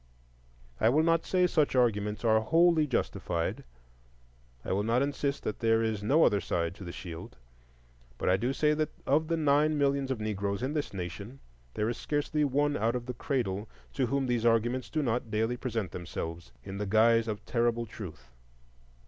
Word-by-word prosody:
I 110 - +4
will 150 +6 +3
not 165 0 +2
say 180 -1 +3
such 155 -6 +1
arguments 105 -3 +1
are 110 -1 +5
wholly 165 +5 +3
justified,—I - - -5
will 100 - +1
not 115 +5 +2
insist 140 0 -2
that 105 - -3
there 115 0 +3
is 110 -2 -1
no 140 +10 +4
other 100 -1 +3
side 85 -1 -1
to 95 - -11
the 85 - -6
shield; 85 -6 -8 0.8
but - - -3
I 90 - +5
do 120 +7 0
say 150 +2 +2
that 155 0 0 0.2
of 155 +3 +2
the 165 0 0
nine 150 0 +3
millions 140 -1 +1
of 130 -4 -2
Negroes 100 0 -2
in 135 +3 -1
this 150 -2 -2
nation, 100 +7 -6 0.4
there 105 - 0
is 120 - -2
scarcely 150 0 -1
one 145 +1 +1
out 115 +1 0
of 120 -1 -3
the 125 - -4
cradle 110 -5 -2 0.2
to 125 - 0
whom 140 +1 0
these 120 -2 0
arguments 120 +2 +1
do 155 -2 -1
not 120 -2 -1
daily 110 +3 0
present 115 -6 -3
themselves 85 -4 -6
in 100 +1 -7
the 105 - -2
guise 115 +2 +4
of 105 -1 -4
terrible 120 -1 0
truth. 80 - -10
115 Hz, 180 wpm, -30 LUFS, 100-140 Hz, 0.8 s, are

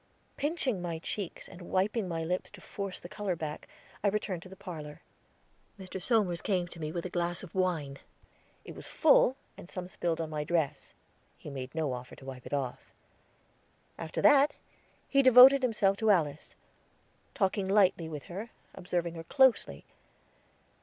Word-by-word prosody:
Pinching 280 - -1
my 170 -2 -3
cheeks 185 +2 -5
and 180 -1 -12
wiping 195 +4 0
my 165 -2 -3
lips 180 +3 -2
to 210 - -13
force 195 0 -5
the - - -9
color 195 -1 -3
back, 155 -2 -6 0.4
I - - +3
returned 200 -3 -1
to 185 - -12
the 190 - -11
parlor. 160 -5 -9 0.8
Mr. 190 0 -6
Somers 200 -8 +1
came 185 -4 0
to 165 - -11
me 155 -1 -3
with 170 +1 -4
a - - -3
glass 175 0 -1
of 180 - -11
wine. 165 -7 -1 0.7
It - - -8
was - - -10
full, 285 -4 +4 0.2
and 175 - -11
some 180 -1 -6
spilled 175 -3 -2
on 160 -1 -3
my 150 -1 -2
dress; 160 -2 -2 0.4
he 150 - -9
made 130 +1 -7
no 155 -5 0
offer 125 0 -8
to 130 - -14
wipe 130 -2 -8
it - - -8
off. 135 -3 -3 1.0
After 160 -1 -5
that, 290 0 +6 0.5
he 275 - +4
devoted 260 +1 +9
himself 210 -6 +2
to 220 0 +1
Alice; 155 -7 +1 0.8
talked 195 -3 +1
lightly 190 -4 +2
with 150 -3 -6
her, 200 +6 -7 0.2
observing 175 -2 -2
her 165 -1 -7
closely. 245 - +2
180 Hz, 165 wpm, -30 LUFS, 160-205 Hz, 1.0 s, devoted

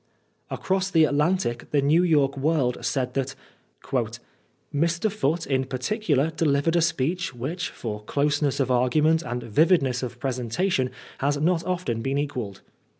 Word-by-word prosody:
'' - - -44
Across 190 0 -1
the 165 -4 +4
Atlantic, 150 -4 0
the 145 - +2
New 150 +5 +4
York 145 -6 +3
World 140 -3 0
said 130 -2 -1
that 135 0 -2 0.3
" - - -36 0.9
Mr. 170 +7 +1
Foote, 165 -5 0
in 130 -1 0
particular, 145 - 0
delivered 160 0 +1
a 170 - +4
speech 165 -1 -1
which, 145 +9 -3
for 105 -2 -6
closeness 145 +1 0
of 130 -2 +1
argument 150 +6 +3
and 125 -6 -4
vividness 135 - +2
of 120 -2 -5
presentation, 130 - 0 0.3
has 145 +1 +1
not 165 +3 +1
often 175 -11 -1
been 135 +3 -1
equalled." 125 -9 -3
145 Hz, 150 wpm, -25 LUFS, 130-165 Hz, 0.9 s, the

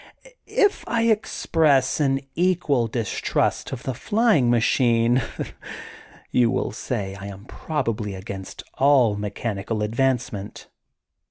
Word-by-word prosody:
If 410 -1 +2
I 230 -1 +1
express 160 - +2
an 135 -2 +1
equal 165 -9 +1
distrust 115 -2 -1
of 130 -1 -6
the 130 - -2
flying 185 - +2
machine, 120 +1 +3 1.1
you 120 -2 +3
will 130 +1 -1
say 100 -6 -4
I 100 0 -8
am 100 0 -10
probably 115 -9 -3
against 95 0 -8 0.2
all 130 -6 +4
mechanical 105 +1 -3
advancement. 120 -2 -2
120 Hz, 105 wpm, -23 LUFS, 105-140 Hz, 1.1 s, all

